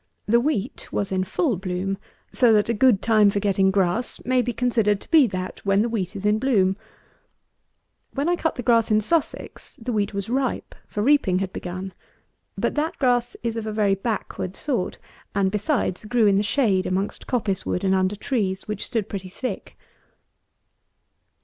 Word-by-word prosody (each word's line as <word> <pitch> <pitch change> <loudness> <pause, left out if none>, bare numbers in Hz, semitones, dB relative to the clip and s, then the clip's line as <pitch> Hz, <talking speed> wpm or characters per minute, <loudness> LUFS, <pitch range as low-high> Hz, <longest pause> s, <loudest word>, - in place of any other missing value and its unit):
The 235 +3 +4
wheat 245 -2 -2
was 200 -1 -2
in 185 -1 +1
full 255 - 0
bloom; 185 +1 -2 0.4
so 245 -3 +5
that 210 +1 +3
a - - +3
good 230 -2 +3
time 215 -3 +5
for 200 - 0
getting 195 -1 +2
grass 190 +4 0
may 255 0 +3
be 245 - -2
considered 225 -5 +1
to - - -14
be 310 -6 +7
that 185 -2 -5
when 200 +1 +3
the 235 - -1
wheat 205 -3 -3
is 200 0 -5
in 210 +1 +3
bloom. 200 -7 +2 1.4
When 280 +3 0
I 350 - +3
cut 325 -2 -1
the 245 - -5
grass 230 -1 +3
in 215 -1 +4
Sussex, 310 +9 -2
the 240 +1 -3
wheat 205 -1 0
was 200 -1 -4
ripe, 260 +2 -1
for 210 - -3
reaping 260 -9 +3
had 190 0 -3
begun; 185 +1 -6 0.6
but - - 0
that 305 +2 -1
grass 245 -3 +1
is 230 -1 -1
of 225 -1 -4
a - - -2
very 210 -2 +2
backward 195 -2 -3
sort, 250 -11 -2 0.4
and, 195 -1 +2
besides, 210 - -1
grew 230 +1 +2
in 200 -1 +4
the - - +3
shade 210 -4 +1
amongst 190 +2 -2
coppice 210 -7 -1
wood 180 - -2
and 190 -1 +2
under 190 +1 +1
trees, 200 -4 -2
which 210 -1 -3
stood 225 -5 -2
pretty 190 -3 -6
thick. 250 +7 -6
210 Hz, 185 wpm, -24 LUFS, 195-245 Hz, 1.4 s, be